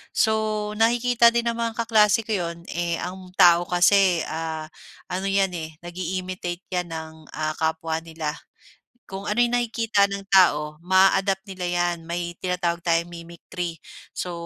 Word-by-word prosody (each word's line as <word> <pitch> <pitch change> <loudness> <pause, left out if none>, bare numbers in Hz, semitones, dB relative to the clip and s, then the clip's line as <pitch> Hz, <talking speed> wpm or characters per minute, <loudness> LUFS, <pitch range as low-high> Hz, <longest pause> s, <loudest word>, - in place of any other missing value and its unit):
So. 215 -1 +1
nakikita 235 0 +4
din 235 - +2
ng 230 - -7
mga 230 -1 -2
kaklase 220 -1 +4
ko 220 - -7
yun, 170 -3 -3
eh, 170 0 -1
ang 185 +1 -7
tao 175 0 +6
kasi, 180 -1 +4
ah, 160 0 -4 0.4
ano 190 +2 -2
yan, 195 -1 +2
eh, 160 -2 -6
nag-i-imitate 180 0 -5
yan 180 -2 -2
ng, 160 -1 -6 0.2
ah, 155 0 -2
kapwa 160 0 -1
nila. 160 -2 -5 0.8
Kung 195 +1 -7
ano 210 - -1
yung 240 0 +3
nakikita 225 -4 +1
ng 200 0 -5
tao 150 -5 +4
ma-a-adapt 190 +2 +3
nila 185 -3 -5
yan. 175 0 0
May 175 0 -3
tinatawag 180 -2 -1
tayong 170 0 +1
mimicry. 170 0 -7 0.4
So, 180 - -3
180 Hz, 150 wpm, -24 LUFS, 170-200 Hz, 0.8 s, tao